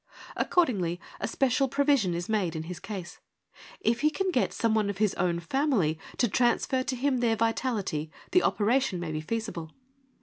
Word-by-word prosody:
Accordingly 195 - +1 0.2
a - - -2
special 270 +3 +2
provision 275 - +2
is 175 +1 -3
made 195 -7 0
in 160 - -3
his 175 +1 -7
case. 185 -4 -7 0.6
If 235 +1 +1
he 305 - +4
can 380 +4 -1
get 250 - +1
some 230 -1 +1
one 215 -2 +2
of 200 - -3
his 210 -1 +2
own 175 -1 0
family 180 - +1 0.2
to 240 - +3
transfer 245 +4 +2
to 255 0 -2
him 260 0 +1
their 235 -2 +2
vitality, 220 - -1 0.2
the 365 - +5
operation 225 - +1
may 170 -2 -4
be 155 0 -3
feasible. 190 -4 -4
220 Hz, 175 wpm, -28 LUFS, 175-255 Hz, 0.6 s, the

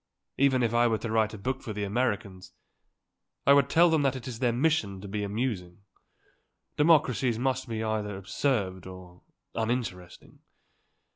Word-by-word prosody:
If 130 -4 +2
I 120 0 +4
were 110 -1 +1
to 110 0 -5
write 110 -1 +1
a - - -8
book 130 +6 -3
for 115 -5 -6
the 105 0 -3
Americans, 100 -4 -2 0.9
I 140 - +7
would 140 -2 +4
tell 170 +1 +5
them 160 -2 +3
that 135 -2 +1
it 130 -2 -7
is 120 -3 -6
their 125 -2 +2
mission 120 -7 0
to 100 - -9
be 105 +1 -3
amusing. 100 -4 -3 0.9
Democracies 140 -6 +3
must 130 +1 -1
be 110 -1 -3
either 105 -2 -2
absurd 95 -2 -2
or 90 -1 -12 0.3
uninteresting. 110 -6 -4
115 Hz, 155 wpm, -28 LUFS, 100-130 Hz, 0.9 s, I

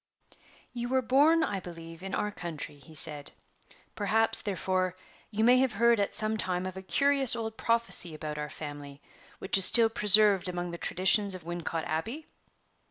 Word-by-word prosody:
"You 240 0 -6
were 260 0 0
born, 295 +7 +2
I 200 -9 -3
believe, 165 -2 -12
in 195 0 -6
our 210 - -3
county," 165 -6 -8
he 150 +4 -17
said; 145 -1 -1 0.6
"perhaps, 220 +2 +1
therefore, 185 -2 -3 0.3
you 215 +1 -3
may 250 +2 +4
have 260 -3 0
heard 235 0 +2
at 200 - -2
some 215 0 -1
time 185 -3 -2
of 185 0 -7
a 190 - -8
curious 275 +5 +1
old 225 -1 -6
prophecy 230 -9 +1
about 150 -1 -7
our 150 0 -6
family, 145 -2 -10 0.4
which 190 +1 0
is 190 - +12
still 230 -2 +6
preserved 210 -3 +5
among 175 -1 -5
the 170 - -9
traditions 190 +2 +2
of 180 - -11
Wincot 170 -1 -5
Abbey?" 225 - -5
195 Hz, 170 wpm, -27 LUFS, 170-225 Hz, 0.6 s, is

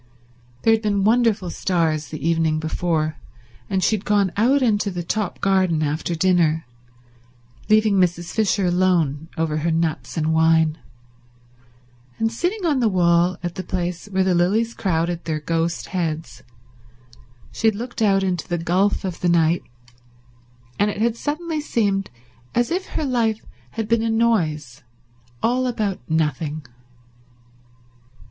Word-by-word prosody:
There 225 - +5
had 220 - +1
been 205 -2 0
wonderful 220 -4 +2
stars 160 -5 0
the 155 +1 -5
evening 165 -2 +2
before, 160 -1 -1 0.5
and 190 -2 0
she 220 - +3
had 205 - -6
gone 200 -3 +2
out 255 +6 +3
into 205 -3 +1
the 175 -2 -4
top 205 +2 -2
garden 185 -5 +2
after 155 +3 -2
dinner, 165 -3 +2 1.0
leaving 215 -1 +4
Mrs. 175 -2 0
Fisher 210 -3 +1
alone 175 -4 +1
over 160 -1 0
her 160 +2 0
nuts 165 0 -1
and 160 0 +1
wine, 160 -1 +3 1.4
and, 225 0 0
sitting 355 - -2
on 295 -5 +2
the 235 -3 +3
wall 175 -1 +3
at 175 -1 -3
the 185 - -5
place 180 0 -3
where 190 -2 +1
the 185 -1 +2
lilies 210 +7 +1
crowded 170 -5 -1
their 155 -2 -2
ghost 165 +2 -2
heads, 165 -3 -3 1.1
she 225 - 0
had 220 - +3
looked 235 +2 -6
out 195 -2 +3
into 180 -4 -2
the 175 - -1
gulf 185 +5 +1
of 180 -3 -4
the 175 - +1
night, 170 0 +3 1.2
and 205 - +3
it 205 - -4
had 225 +2 +1
suddenly 310 +4 -3
seemed 200 -8 0 0.5
as 240 +3 +1
if 370 +2 -1
her 310 - -3
life 230 -4 0 0.3
had 220 -2 -3
been 230 0 +2
a 225 - 0
noise 160 - 0 0.6
all 250 +2 +2
about 210 -6 -2
nothing. 155 -1 -1
185 Hz, 145 wpm, -22 LUFS, 165-220 Hz, 1.4 s, There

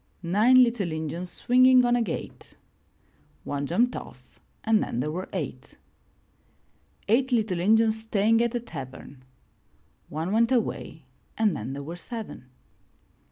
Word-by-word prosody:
Nine 220 +9 +5
little 230 -8 -1
Injuns 160 +3 -4
swinging 255 +3 +4
on 240 0 +3
a 240 - +1
gate 200 -8 -6 0.4
— - - -37
One 140 0 -3
jumped 235 - +1
off - - -11 0.2
and 220 -1 +3
then 120 - -3
there 150 +4 -1
were 180 +4 -5
eight. - - -6 1.3
Eight 255 +5 +2
little 215 -7 +1
Injuns 220 +3 +3
staying 225 +1 +2
at 235 0 0
a - - +1
tavern 135 - -10 0.4
— - - -39
One 160 +4 -3
went 230 +3 +2
away 215 - -2 0.3
and 215 -5 +2
then 115 +5 -5
there 140 +1 -6
were 165 +4 -7
seven. 220 - -8
215 Hz, 145 wpm, -26 LUFS, 160-235 Hz, 1.3 s, Nine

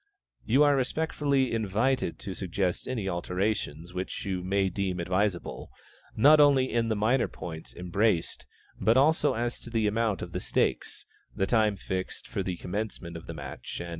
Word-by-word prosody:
You 130 +7 +4
are 145 -1 +5
respectfully 140 -1 0
invited 115 +5 0
to 95 - -5
suggest 90 -1 -2
any 115 -6 -2
alterations 90 -2 -2
which 90 +3 -4
you 95 -2 -2
may 95 +1 +1
deem 95 -1 -2
advisable, 90 +1 -1 0.5
not 150 +7 +7
only 140 -3 +5
in 115 -1 +2
the 110 - +1
minor 115 +5 +2
points 80 -2 -8
embraced, 90 +1 0 0.3
but 115 +3 +4
also 145 0 +4
as 120 +1 -2
to - - -10
the 115 -2 0
amount 110 -1 0
of - - -7
the - - -3
stakes, - - -1 0.3
the 95 - +1
time 110 -1 +2
fixed 95 0 -5
for - - -3
the 90 -2 -3
commencement 90 -3 -5
of 80 - -9
the 80 - -6
match, 75 - -7
&c. 85 - -5
105 Hz, 165 wpm, -28 LUFS, 90-120 Hz, 0.5 s, not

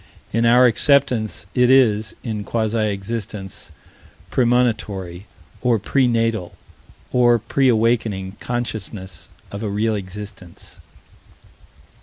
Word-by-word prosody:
In 115 +1 +2
our 125 +2 +6
acceptance, 125 -3 +2
it 125 0 +3
is, 110 -5 +3
in 110 -3 -4
quasi 110 0 0
existence, 100 -1 -5 0.6
premonitory, 110 -7 0 0.3
or 120 -2 +2
pre 125 +6 +1
natal, 115 -6 -1 0.6
or 120 -1 +4
pre 135 +4 0
awakening 110 -4 0
consciousness 110 -5 -5 0.2
of 100 - -6
a 110 - -2
real 110 +2 0
existence. 100 -2 -9
110 Hz, 100 wpm, -21 LUFS, 100-120 Hz, 0.6 s, our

